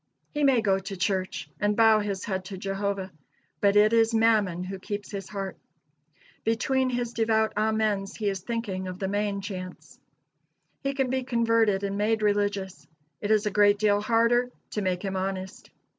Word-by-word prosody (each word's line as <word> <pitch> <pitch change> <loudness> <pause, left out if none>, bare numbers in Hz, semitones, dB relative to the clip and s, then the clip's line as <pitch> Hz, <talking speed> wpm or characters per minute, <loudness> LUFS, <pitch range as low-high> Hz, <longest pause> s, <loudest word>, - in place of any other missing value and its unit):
He 295 -1 -1
may 265 -4 +4
go 195 -2 +2
to 195 0 -7
church 185 +1 -1
and 205 0 +1
bow 220 -1 +6
his 200 -2 -3
head 190 -2 -3
to 190 0 -7
Jehovah, 195 0 -3 0.5
but 200 0 +3
it 210 +2 +5
is 225 0 +4
Mammon 215 -6 +2
who 190 +1 -6
keeps 205 +2 -5
his 200 -2 -6
heart. 195 -2 -5 0.9
Between 255 +4 +1
his 245 -1 -2
devout 220 -1 +1
amens 215 -2 0
he 215 - -3
is 195 -1 -1
thinking 195 -3 -4
of 180 0 -6
the 190 - -2
main 205 0 -1
chance. 185 -3 -8 0.8
He 275 0 -2
can 265 -2 0
be 260 0 0
converted 230 -5 +2
and 200 0 -2
made 215 +1 +1
religious; 205 -2 -1 0.3
it 205 - -3
is 215 0 +3
a 210 - 0
great 205 0 +4
deal 205 -1 +2
harder 235 +3 +2 0.2
to 210 - -2
make 185 -1 -1
him 195 -1 -2
honest. 190 0 -4
205 Hz, 175 wpm, -27 LUFS, 195-225 Hz, 0.9 s, bow